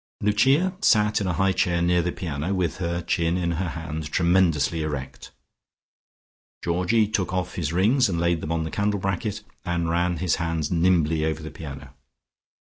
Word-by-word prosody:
Lucia 135 Hz, -, +2 dB
sat 105 Hz, -, +3 dB
in 100 Hz, -, -1 dB
a 90 Hz, -, 0 dB
high 95 Hz, +3 st, +2 dB
chair 90 Hz, -2 st, +1 dB
near 85 Hz, 0 st, +2 dB
the 85 Hz, +1 st, -1 dB
piano, 85 Hz, +2 st, -3 dB
with 90 Hz, -2 st, -1 dB
her 85 Hz, -1 st, -2 dB
chin 85 Hz, +1 st, 0 dB
in 85 Hz, -1 st, -1 dB
her 90 Hz, +2 st, -2 dB
hand, 80 Hz, -2 st, -5 dB
tremendously 85 Hz, -3 st, +2 dB
erect. 75 Hz, -4 st, -5 dB, 1.3 s
Georgie 90 Hz, +6 st, +2 dB
took 100 Hz, -4 st, -1 dB
off 90 Hz, -1 st, -2 dB
his 80 Hz, -4 st, -2 dB
rings 110 Hz, +8 st, +3 dB
and 85 Hz, -3 st, -1 dB
laid 85 Hz, -1 st, +1 dB
them 80 Hz, -, -4 dB
on 80 Hz, -1 st, 0 dB
the 80 Hz, -, -5 dB
candle 100 Hz, 0 st, 0 dB
bracket, 100 Hz, +3 st, -2 dB, 0.2 s
and 85 Hz, -2 st, -1 dB
ran 85 Hz, +1 st, +1 dB
his 90 Hz, +1 st, 0 dB
hands 80 Hz, -2 st, -2 dB
nimbly 85 Hz, -3 st, +2 dB
over 80 Hz, 0 st, -2 dB
the 80 Hz, -, -7 dB
piano. 75 Hz, -4 st, -9 dB
85 Hz, 175 wpm, -24 LUFS, 80-95 Hz, 1.3 s, sat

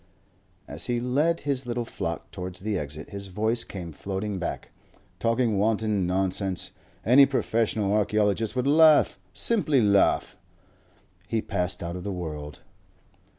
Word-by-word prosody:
As -, -, -3 dB
he 120 Hz, -1 st, 0 dB
led 145 Hz, +8 st, +1 dB
his 135 Hz, -3 st, -2 dB
little 120 Hz, 0 st, -2 dB
flock 85 Hz, -6 st, -5 dB
towards 90 Hz, -1 st, -6 dB
the 105 Hz, +1 st, -2 dB
exit 75 Hz, 0 st, -5 dB
his 100 Hz, -1 st, -6 dB
voice 110 Hz, +5 st, +1 dB
came 90 Hz, -4 st, -7 dB
floating 95 Hz, +4 st, -4 dB
back. 90 Hz, -, -5 dB, 0.5 s
"Talking 115 Hz, -3 st, +1 dB
wanton 105 Hz, -3 st, +1 dB
nonsense.... 95 Hz, 0 st, -1 dB, 0.3 s
Any 135 Hz, +4 st, +7 dB
professional 110 Hz, -6 st, 0 dB
archaeologist 105 Hz, +1 st, +1 dB
would 125 Hz, 0 st, 0 dB
laugh, 155 Hz, +1 st, +5 dB
simply 180 Hz, -, +2 dB
laugh...." 100 Hz, -3 st, +2 dB, 0.9 s
He 115 Hz, +3 st, 0 dB
passed 90 Hz, -4 st, -2 dB
out 85 Hz, +1 st, -4 dB
of 90 Hz, -, -6 dB
the 100 Hz, -, -3 dB
world. 75 Hz, -5 st, -6 dB
105 Hz, 135 wpm, -26 LUFS, 95-120 Hz, 0.9 s, Any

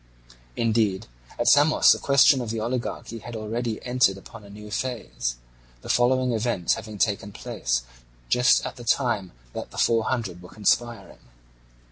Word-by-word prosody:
Indeed 110 Hz, -4 st, +1 dB, 0.3 s
at -, -, -1 dB
Samos 150 Hz, +2 st, +6 dB
the -, -, +3 dB
question 140 Hz, -1 st, +5 dB
of 120 Hz, -, -5 dB
the 115 Hz, 0 st, -3 dB
oligarchy 120 Hz, 0 st, -4 dB
had 120 Hz, +2 st, -9 dB
already 110 Hz, +1 st, -3 dB
entered 125 Hz, -6 st, +2 dB
upon 105 Hz, +3 st, -12 dB
a 100 Hz, -, -14 dB
new 105 Hz, +1 st, -11 dB
phase, 105 Hz, -, -3 dB, 0.5 s
the -, -, -9 dB
following 125 Hz, 0 st, +2 dB
events 110 Hz, -6 st, 0 dB
having 110 Hz, -1 st, -7 dB
taken 100 Hz, +1 st, 0 dB
place -, -, -2 dB, 0.4 s
just 125 Hz, -, +3 dB
at -, -, -6 dB
the 120 Hz, -, -9 dB
time 115 Hz, -6 st, 0 dB, 0.2 s
that -, -, -6 dB
the -, -, -13 dB
Four 115 Hz, -1 st, +2 dB
Hundred 100 Hz, -9 st, -3 dB
were 90 Hz, -, -12 dB
conspiring. 120 Hz, +3 st, -1 dB
115 Hz, 155 wpm, -25 LUFS, 105-125 Hz, 0.5 s, Samos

